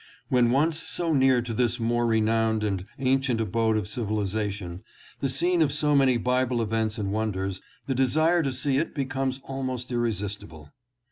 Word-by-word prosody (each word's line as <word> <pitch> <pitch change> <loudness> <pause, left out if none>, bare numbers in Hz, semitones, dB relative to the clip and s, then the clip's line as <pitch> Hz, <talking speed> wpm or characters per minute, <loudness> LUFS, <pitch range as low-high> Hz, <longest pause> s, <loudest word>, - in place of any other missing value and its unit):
When 125 -2 +4
once 155 +5 +2
so 170 -2 -1
near 130 -3 +4
to 120 -1 -4
this 120 +1 0
more 120 +1 +1
renowned 110 0 +2
and 100 -2 -2
ancient 130 -2 +1
abode 110 +1 +1
of 105 -4 -2
civilization, 100 -5 -3 0.4
the 135 - -1
scene 170 +7 +1
of 150 -3 +3
so 150 0 +1
many 135 -3 +4
Bible 125 +1 +1
events 110 0 -1
and 100 -2 -2
wonders, 95 -3 -2 0.2
the 135 - -1
desire 155 +7 +3
to 140 -4 -1
see 130 +1 0
it 165 - -3
becomes 135 -1 -2
almost 130 -2 -4
irresistible. 100 -10 -4
120 Hz, 160 wpm, -26 LUFS, 110-135 Hz, 0.4 s, When